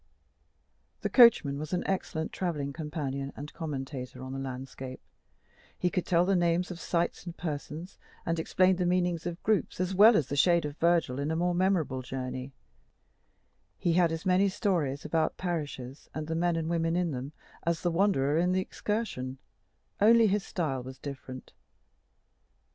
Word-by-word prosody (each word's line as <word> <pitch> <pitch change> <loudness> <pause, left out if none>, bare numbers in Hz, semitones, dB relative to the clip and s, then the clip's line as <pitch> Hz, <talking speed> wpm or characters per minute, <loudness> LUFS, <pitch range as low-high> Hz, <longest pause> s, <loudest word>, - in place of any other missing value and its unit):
The - - -2
coachman 185 - +6
was 155 +3 -5
an 180 - 0
excellent 180 -4 -2
travelling 150 -6 -2
companion 140 -3 -4
and 145 +2 -8
commentator 135 -4 -5
on 130 0 -6
the 135 - -4
landscape: 130 0 -6 0.8
he 180 - 0
could 180 - -1
tell 175 0 +4
the 195 +1 +2
names 175 +1 +1
of 175 - -7
sites 170 -1 -1
and 175 - -7
persons, 155 +2 -5 0.3
and 165 -1 0
explain 185 +3 +3
the 180 - 0
meaning 175 -1 +1
of 175 0 -5
groups, 215 -4 0
as 185 +1 0
well 210 +4 +8
as 155 - +1
the 140 - -4
shade 170 +2 +4
of 145 -1 -5
Virgil 165 -6 +2
in 145 +2 -1
a 160 - 0
more 175 +2 +1
memorable 175 -8 +1
journey; 130 +1 -5 1.3
he 170 - +1
had 170 -1 +4
as 165 +3 -4
many 190 +2 +4
stories 160 -8 -1
about 155 +1 0
parishes, 145 -7 -4
and 155 0 -3
the 160 - -3
men 170 +1 +1
and 165 -1 -2
women 165 0 0
in 175 -2 +1
them, 130 +1 -5 0.3
as 170 -1 -1
the 175 - +2
Wanderer 165 -5 +2
in 180 +1 +2
the 185 - +2
"Excursion," 185 - -3 0.6
only 230 +2 +6
his 205 -1 +2
style 150 -10 -2
was 130 +1 -9
different. 130 -2 -8
165 Hz, 170 wpm, -29 LUFS, 140-180 Hz, 1.3 s, well